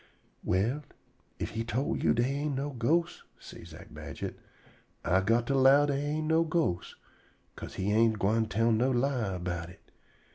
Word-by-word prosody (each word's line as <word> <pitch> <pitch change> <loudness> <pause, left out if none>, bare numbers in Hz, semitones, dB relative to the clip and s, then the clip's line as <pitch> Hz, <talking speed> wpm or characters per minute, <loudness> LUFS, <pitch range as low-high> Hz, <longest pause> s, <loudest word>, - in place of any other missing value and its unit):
"Well, 110 +11 0 0.6
if - - -4
he 115 +1 -3
tol' 120 +4 -1
you - - +2
dey 120 - +2
ain' 140 +2 -2
no 140 +2 -2
ghosts," 155 +8 0 0.2
say - - -12
Zack - - -12
Badget, - - -6 0.7
"I 95 +3 +3
got 115 +4 +2
to 135 - 0
'low 135 +2 +6
dey 140 -1 -1
ain't 155 +1 -2
no 160 +1 +3
ghosts, 155 - -1 0.6
'ca'se - - -9
he 95 +2 -1
ain't 110 0 +3
gwine 110 +3 +1
tell 115 +3 +1
no 120 +4 +2
lie 125 -6 0
erbout 90 -1 -4
it. 90 - -18
120 Hz, 170 wpm, -30 LUFS, 105-140 Hz, 0.7 s, low